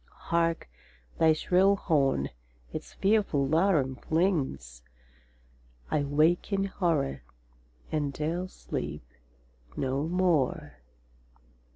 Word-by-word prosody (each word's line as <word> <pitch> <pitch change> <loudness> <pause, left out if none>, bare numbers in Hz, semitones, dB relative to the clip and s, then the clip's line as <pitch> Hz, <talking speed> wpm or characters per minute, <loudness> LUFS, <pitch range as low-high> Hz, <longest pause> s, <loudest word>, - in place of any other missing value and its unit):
Hark, 165 - +1 0.5
thy 160 -1 +6
shrill 185 +5 +3
horn 140 - +1 0.4
its - - -7
fearful 195 -9 +1
laram 155 -5 +2
flings! 140 - -1 1.1
—I 145 - +1
wake 155 +7 +2
in 195 -1 +1
horror, 170 -8 -1 0.7
and 145 -2 0
'dare 165 +6 -2
sleep 75 - -5 0.7
no 135 +3 -1
more! 165 - 0
155 Hz, 85 wpm, -28 LUFS, 135-180 Hz, 1.1 s, thy